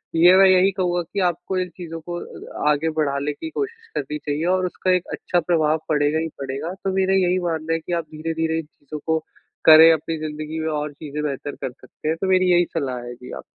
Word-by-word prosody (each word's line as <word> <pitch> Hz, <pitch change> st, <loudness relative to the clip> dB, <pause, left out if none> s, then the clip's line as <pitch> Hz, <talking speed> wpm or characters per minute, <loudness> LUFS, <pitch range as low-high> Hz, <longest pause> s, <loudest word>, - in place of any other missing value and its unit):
ये 175 Hz, +3 st, +7 dB
मैं 195 Hz, -, +8 dB
यही 185 Hz, +1 st, +5 dB
कहूँगा 175 Hz, -1 st, +1 dB
कि 200 Hz, -, -1 dB
आपको 175 Hz, +2 st, -4 dB
इन 180 Hz, 0 st, -2 dB
चीज़ों 165 Hz, -2 st, -6 dB
को 175 Hz, 0 st, -3 dB
अ 150 Hz, -, -4 dB
आगे 150 Hz, +2 st, +1 dB
बढ़ाने 140 Hz, -1 st, 0 dB
की 320 Hz, -, -7 dB
कोशिश 455 Hz, +6 st, -5 dB
करनी 150 Hz, +2 st, -3 dB
चाहिए 150 Hz, +2 st, -3 dB
और 185 Hz, -1 st, 0 dB
उसका 185 Hz, +1 st, -1 dB
एक 180 Hz, -1 st, +1 dB
अच्छा 175 Hz, -, 0 dB
प्रभाव 160 Hz, -2 st, +1 dB
पड़ेगा 150 Hz, 0 st, +2 dB
ही 165 Hz, -, -1 dB
पड़ेगा। 140 Hz, +5 st, -4 dB
तो 190 Hz, -, 0 dB
मेरा 190 Hz, 0 st, +2 dB
यही 185 Hz, -1 st, +3 dB
मानना 165 Hz, -1 st, -1 dB
है 165 Hz, -, 0 dB
कि 170 Hz, +2 st, -5 dB
आप 170 Hz, -2 st, -1 dB
धीरे-धीरे 160 Hz, +1 st, -1 dB
इन 165 Hz, -, -6 dB
चीज़ों 150 Hz, 0 st, -10 dB
को 160 Hz, 0 st, +2 dB, 0.5 s
करें 160 Hz, +1 st, +10 dB
अपनी 160 Hz, +1 st, -2 dB
ज़िंदगी 155 Hz, +1 st, -5 dB
में 160 Hz, -, -2 dB
और 150 Hz, 0 st, -3 dB
चीज़ें 150 Hz, 0 st, -6 dB
बेहतर 145 Hz, 0 st, -4 dB
कर 130 Hz, -, -3 dB
सकते 135 Hz, -, -11 dB
हैं। 160 Hz, -, 0 dB
तो 190 Hz, -, 0 dB
मेरी 185 Hz, -1 st, +4 dB
यही 175 Hz, 0 st, +5 dB
सलाह 135 Hz, -6 st, -2 dB
है 120 Hz, -, -6 dB
जी 125 Hz, +1 st, -11 dB
आपको। -, -, -7 dB
160 Hz, 230 wpm, -22 LUFS, 150-180 Hz, 0.5 s, करें